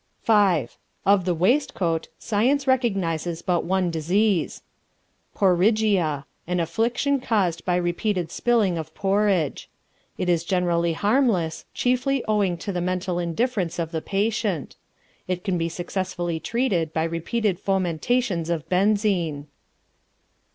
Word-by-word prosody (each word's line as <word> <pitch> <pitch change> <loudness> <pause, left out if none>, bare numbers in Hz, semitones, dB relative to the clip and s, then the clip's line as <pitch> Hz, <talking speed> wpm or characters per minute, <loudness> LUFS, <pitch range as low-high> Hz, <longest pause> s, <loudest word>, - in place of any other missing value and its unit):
V. 200 - +4 0.4
Of 195 -2 +4
the 180 -2 +1
waistcoat 175 - +1
science 255 +6 +1
recognizes 185 - 0
but 175 -2 0
one 185 0 +1
disease 175 +3 0 0.7
Porriggia, 185 -6 +2 0.2
an 180 0 0
affliction 235 - 0
caused 190 -9 0
by 180 - +1
repeated 175 0 -1
spilling 215 -8 +1
of 160 0 -8
porridge. 195 -6 0 0.5
It 185 - -2
is 170 -2 +2
generally 170 -2 +1
harmless, 205 - +1
chiefly 255 +1 +1
owing 200 -5 +1
to 200 - -1
the 180 -2 -2
mental 180 0 -1
indifference 175 +1 -1
of 165 -2 -2
the 160 - -2
patient. 200 - -1 0.5
It 180 -1 -2
can 185 -4 -1
be 165 0 -1
successfully 175 -1 -3
treated 175 -5 -1
by 160 - 0
repeated 175 +4 -1
fomentations 190 0 0
of 165 -3 -2
benzine. 185 -6 +1
185 Hz, 120 wpm, -24 LUFS, 170-215 Hz, 0.7 s, V